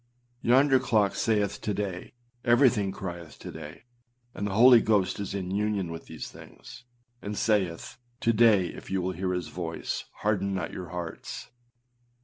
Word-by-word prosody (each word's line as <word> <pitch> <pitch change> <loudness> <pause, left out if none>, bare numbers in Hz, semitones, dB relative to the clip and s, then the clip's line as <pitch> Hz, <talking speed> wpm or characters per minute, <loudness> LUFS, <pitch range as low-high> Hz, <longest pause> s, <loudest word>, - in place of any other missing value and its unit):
Yonder 130 +2 +5
clock 110 -6 +2
saith 105 -3 0
âto 105 - -2
day;â 95 -3 -4 0.3
everything 120 -5 +4
crieth 85 -4 -7
âto - - -9
day;â 75 -1 -9 0.5
and 100 - -3
the 95 - -3
Holy 120 +1 +8
Ghost 100 -4 +1
is 100 -1 -4
in 95 -2 -3
union 100 -3 -1
with 80 0 -8
these 80 - -7
things, 125 0 -13 0.4
and 105 0 -5
saith, 100 0 0 0.2
âTo 115 -1 +2
day 105 -5 +5
if - - -10
ye 95 - 0
will 95 0 -1
hear 90 +1 -2
his 90 -3 -3
voice, 85 -2 -4 0.2
harden 100 -2 0
not 90 -3 -3
your 90 -1 -6
hearts. 85 -2 -6
100 Hz, 160 wpm, -28 LUFS, 90-110 Hz, 0.5 s, Holy